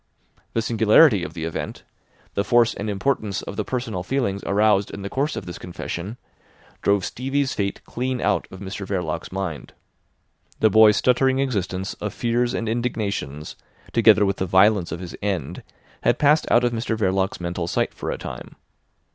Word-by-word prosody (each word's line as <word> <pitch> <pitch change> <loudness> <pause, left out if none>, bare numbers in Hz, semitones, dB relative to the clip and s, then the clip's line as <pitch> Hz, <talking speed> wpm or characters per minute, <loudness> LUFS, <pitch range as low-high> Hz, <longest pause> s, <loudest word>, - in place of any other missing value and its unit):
The 115 - 0
singularity 110 - +5
of - - -6
the 80 - -5
event, 80 0 -5 0.5
the 100 - 0
force 120 +2 +4
and 105 +2 -4
importance 105 -1 -1
of - - -7
the - - -1
personal 120 -7 -3
feelings 100 -2 -1
aroused 105 0 +3
in 100 - -7
the 100 - -5
course 140 +3 -1
of - - -5
this 90 - -7
confession, 90 +4 -6 0.6
drove 100 -1 +2
Stevie's 135 +2 -1
fate 100 -1 -3
clean 125 +1 -2
out - - 0
of 95 - -11
Mr 100 +1 -5
Verloc's 90 -6 -3
mind. 95 -5 -5 0.9
The 110 - +4
boy's 110 0 +7
stuttering 130 +1 +3
existence 95 -8 -2
of 105 - -6
fears 120 0 0
and 115 - -2
indignations, 105 - -3 0.4
together 105 - +6
with 100 0 0
the 95 - -2
violence 95 0 +4
of 85 +2 -5
his 90 - -7
end, 90 -6 -2 0.4
had - - +2
passed 150 +2 +3
out 120 - +4
of 120 - +2
Mr 115 -1 -2
Verloc's 95 -2 0
mental 85 -1 -3
sight - - 0
for - - -5
a - - -2
time. - - -8
105 Hz, 170 wpm, -23 LUFS, 95-120 Hz, 0.9 s, boy's